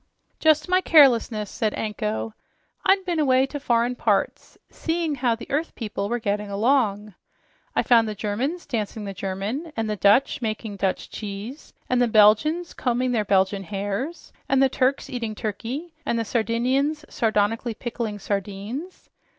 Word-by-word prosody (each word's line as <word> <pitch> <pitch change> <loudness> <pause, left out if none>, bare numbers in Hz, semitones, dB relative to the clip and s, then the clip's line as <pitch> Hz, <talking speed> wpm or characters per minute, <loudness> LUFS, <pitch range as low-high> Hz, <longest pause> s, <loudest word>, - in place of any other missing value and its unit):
"Just 310 -1 +3
my 365 +1 +3
carelessness," 245 - +5
said 220 -4 -1
Anko. 215 0 -3 0.5
"I'd 385 -1 +3
been 345 -3 -1
away 260 -3 +4
to 290 +2 -6
foreign 240 -2 +1
parts, 245 - -1
seeing 330 -1 -1
how 245 -4 +1
the 230 - -9
earth 305 +4 -1
people 205 -3 -4
were 240 - 0
getting 210 -2 -2
along. 210 -1 +1 0.6
I - - +2
found 230 -2 +4
the 215 - -4
Germans 240 - -2
dancing 215 -2 -3
the 195 - -5
german 200 - -4
and 225 -1 -1
the 210 - -1
Dutch 205 +7 +3
making 215 -2 -3
dutch 190 -1 -2
cheese 210 +7 -7 0.2
and 250 -1 +2
the 245 - +4
Belgians 225 +11 +4
combing 250 0 0
their 225 -3 +1
belgian 195 0 +2
hares 205 - -4 0.2
and 270 - +3
the 270 0 +5
Turks 260 +1 0
eating 230 -4 -4
turkey 245 - -5
and 235 - -1
the 230 - -1
Sardinians 255 +7 0
sardonically 225 +1 0
pickling 230 -2 -4
sardines. 205 - -5
230 Hz, 155 wpm, -24 LUFS, 210-270 Hz, 0.6 s, carelessness